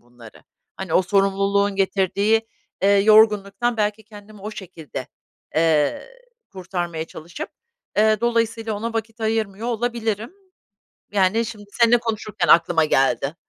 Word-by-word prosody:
bunları. 120 Hz, -2 st, -16 dB, 0.3 s
Hani, 190 Hz, -4 st, -4 dB
o 185 Hz, -, +5 dB
sorumluluğun 195 Hz, +1 st, +1 dB
getirdiği, 200 Hz, +3 st, +1 dB, 0.4 s
eee, 195 Hz, -, +4 dB
yorgunluktan 215 Hz, +2 st, +4 dB
belki 210 Hz, 0 st, -1 dB
kendimi 210 Hz, -1 st, -14 dB
o 210 Hz, -, -6 dB
şekilde, 165 Hz, -10 st, -8 dB, 0.5 s
eee, 160 Hz, -, +2 dB, 0.4 s
kurtarmaya 175 Hz, -3 st, -4 dB
çalışıp, 170 Hz, +2 st, -8 dB, 0.5 s
eee, 215 Hz, 0 st, +3 dB
dolayısıyla 230 Hz, -2 st, 0 dB
ona 225 Hz, +3 st, -4 dB
vakit 225 Hz, 0 st, -4 dB
ayırmıyor 220 Hz, 0 st, -2 dB
olabilirim. 230 Hz, -, -2 dB, 0.8 s
Yani, 200 Hz, +3 st, +2 dB
şimdi 215 Hz, -2 st, -8 dB
seninle 235 Hz, 0 st, +4 dB
konuşurken 215 Hz, -5 st, -3 dB
aklıma 165 Hz, -1 st, +5 dB
geldi. 135 Hz, +1 st, +1 dB
205 Hz, 115 wpm, -22 LUFS, 185-225 Hz, 0.8 s, o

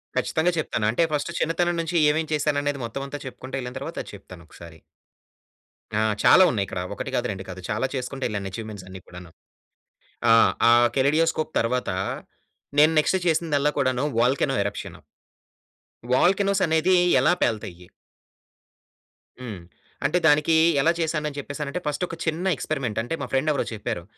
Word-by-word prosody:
ఖచ్చితంగా 160 Hz, +3 st, +1 dB
చెప్తాను. 120 Hz, -7 st, -2 dB
అంటే 120 Hz, -, +1 dB
ఫస్ట్ 150 Hz, +3 st, -1 dB
చిన్నతనం 175 Hz, +2 st, 0 dB
నుంచి 165 Hz, +1 st, -4 dB, 0.2 s
ఏమేం 160 Hz, +1 st, -1 dB
చేశాను 150 Hz, -1 st, +1 dB
అనేది 145 Hz, -1 st, -2 dB
మొత్తం 115 Hz, +4 st, -5 dB
అంతా 145 Hz, +1 st, -6 dB
చెప్పుకుంటూ 130 Hz, 0 st, -8 dB
యెళ్ళిన 125 Hz, 0 st, -6 dB
తర్వాత 160 Hz, +5 st, -7 dB
ఆది -, -, -12 dB
చెప్తానొకసారి. 85 Hz, -3 st, -13 dB, 1.2 s
ఆ! -, -, +2 dB, 0.2 s
చాలా 190 Hz, -, +7 dB
ఉన్నాయిక్కడ. 100 Hz, -5 st, -3 dB
ఒకటి -, -, -5 dB
కాదు -, -, 0 dB
రెండు 95 Hz, -1 st, -6 dB
కాదు 95 Hz, 0 st, -8 dB
చాలా 110 Hz, +5 st, 0 dB
చేసుకుంటు 130 Hz, +1 st, -5 dB
యెళ్ళాను 100 Hz, -3 st, -4 dB
అచీవ్‌మెంట్స్ 105 Hz, -2 st, -7 dB
అన్ని 95 Hz, 0 st, -9 dB
కూడాను. 90 Hz, -1 st, -12 dB, 1.0 s
ఆహ్, 115 Hz, -, +6 dB, 0.2 s
ఆహ్, 120 Hz, 0 st, +6 dB
కెలిడియోస్కోప్‌ 155 Hz, +4 st, +1 dB
తర్వాత 125 Hz, +1 st, -1 dB, 0.9 s
నేను 155 Hz, +2 st, +6 dB
నెక్స్ట్ 190 Hz, +5 st, +1 dB
చేసిందల్లా 150 Hz, -3 st, +1 dB
కూడాను 130 Hz, -1 st, +1 dB, 0.2 s
వోల్కనో 135 Hz, +3 st, +2 dB
ఎరప్‌షన్. 100 Hz, -, -6 dB, 1.1 s
వోల్కనోసనేది 185 Hz, +1 st, +2 dB, 0.3 s
ఎలా 150 Hz, +7 st, +4 dB
పేలతయ్యి? 90 Hz, -5 st, -2 dB, 1.5 s
హ్మ్. 110 Hz, -7 st, -7 dB, 0.5 s
అంటే 175 Hz, -, +2 dB
దానికి 150 Hz, +1 st, +4 dB, 0.3 s
ఎలా 165 Hz, -, +4 dB
చేశాను 155 Hz, -2 st, -1 dB
అని 145 Hz, -, -11 dB
చెప్పేసానంటే 145 Hz, +3 st, -5 dB
ఫస్ట్ 150 Hz, +4 st, -2 dB
ఒక 165 Hz, -, -7 dB
చిన్న 165 Hz, +3 st, -2 dB
ఎక్స్పెరిమెంట్ 130 Hz, -6 st, -3 dB
అంటే 120 Hz, +8 st, -5 dB
మా 140 Hz, -, -3 dB
ఫ్రెండ్ 135 Hz, +3 st, +1 dB
ఎవరో 145 Hz, -, 0 dB
చెప్పారు. 105 Hz, -5 st, -4 dB
140 Hz, 145 wpm, -24 LUFS, 115-160 Hz, 1.5 s, చాలా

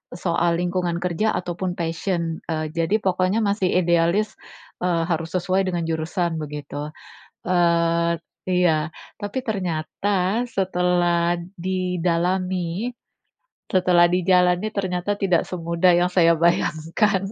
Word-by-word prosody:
soal 170 Hz, -1 st, +1 dB
lingkungan 175 Hz, -1 st, -1 dB
kerja 180 Hz, +5 st, 0 dB
ataupun 180 Hz, +1 st, -3 dB
passion, 165 Hz, 0 st, -2 dB
eee, 155 Hz, -1 st, -2 dB
jadi 170 Hz, +5 st, +1 dB
pokoknya 185 Hz, +3 st, +1 dB
masih 200 Hz, -2 st, +1 dB
idealis, 175 Hz, +3 st, +2 dB, 0.5 s
eee, 170 Hz, -2 st, +1 dB
harus 165 Hz, 0 st, -1 dB
sesuai 185 Hz, +1 st, +1 dB
dengan 175 Hz, -2 st, -2 dB
jurusan, 165 Hz, +1 st, -1 dB
begitu. 150 Hz, 0 st, -6 dB, 0.6 s
Eee 170 Hz, -1 st, +2 dB, 0.3 s
iya, 170 Hz, -3 st, +2 dB, 0.3 s
tapi 205 Hz, +6 st, -3 dB
ternyata 190 Hz, +2 st, -1 dB
setelah 175 Hz, -2 st, +1 dB, 0.2 s
didalami, 180 Hz, +2 st, -1 dB, 0.8 s
setelah 180 Hz, -2 st, +4 dB
dijalani 180 Hz, +2 st, +3 dB
ternyata 190 Hz, 0 st, -1 dB
tidak 185 Hz, -4 st, +2 dB
semudah 170 Hz, 0 st, +2 dB
yang 175 Hz, +1 st, +2 dB
saya 170 Hz, -2 st, +5 dB
bayangkan. 170 Hz, +4 st, +1 dB
175 Hz, 105 wpm, -23 LUFS, 170-185 Hz, 0.8 s, saya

